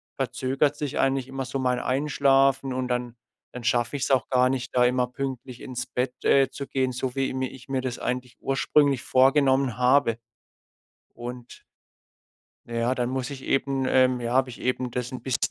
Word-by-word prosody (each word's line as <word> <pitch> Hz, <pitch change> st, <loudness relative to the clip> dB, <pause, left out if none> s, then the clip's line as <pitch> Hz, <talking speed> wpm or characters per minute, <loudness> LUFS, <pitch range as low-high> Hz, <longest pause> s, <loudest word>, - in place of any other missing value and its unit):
verzögert 135 Hz, +2 st, 0 dB
sich 145 Hz, -1 st, -4 dB
eigentlich 135 Hz, -1 st, +1 dB
immer 135 Hz, 0 st, -4 dB
so 135 Hz, +2 st, -4 dB
mein 125 Hz, -1 st, +1 dB
Einschlafen 135 Hz, 0 st, +2 dB
und 130 Hz, 0 st, -2 dB
dann 125 Hz, -1 st, -2 dB, 0.4 s
dann 125 Hz, -, -7 dB
schaffe 120 Hz, +3 st, +1 dB
ich's 135 Hz, -, -2 dB
auch 130 Hz, -2 st, +2 dB
gar 130 Hz, 0 st, +4 dB
nicht, 130 Hz, -1 st, -3 dB
da 125 Hz, -1 st, +5 dB
immer 125 Hz, 0 st, +2 dB
pünktlich 130 Hz, -1 st, -6 dB
ins 125 Hz, -1 st, -5 dB
Bett, 125 Hz, 0 st, -2 dB
äh, 135 Hz, -1 st, +4 dB
zu 140 Hz, -, -6 dB
gehen, 130 Hz, -1 st, -1 dB
so 125 Hz, +1 st, -3 dB
wie 135 Hz, -1 st, +1 dB
i -, -, -5 dB
mi 130 Hz, 0 st, -1 dB
ich 130 Hz, -1 st, -13 dB
mir 135 Hz, -1 st, -1 dB
das 125 Hz, -2 st, -4 dB
eigentlich 125 Hz, 0 st, -4 dB
ursprünglich 135 Hz, -1 st, +2 dB
vorgenommen 135 Hz, -2 st, +3 dB
habe. 125 Hz, -2 st, +3 dB, 1.0 s
Und 120 Hz, 0 st, -8 dB, 1.0 s
ja, 120 Hz, +1 st, 0 dB
dann 125 Hz, -1 st, -1 dB
muss 130 Hz, -1 st, -3 dB
ich 135 Hz, -2 st, -8 dB
eben, 135 Hz, -1 st, 0 dB
ähm 130 Hz, -1 st, +3 dB
ja, 120 Hz, 0 st, -2 dB
habe 130 Hz, 0 st, +3 dB
ich 125 Hz, -, -10 dB
eben 125 Hz, 0 st, -1 dB
das 125 Hz, 0 st, -3 dB
'n 130 Hz, -, -5 dB
bis 130 Hz, -, -1 dB
130 Hz, 185 wpm, -25 LUFS, 125-135 Hz, 1.0 s, da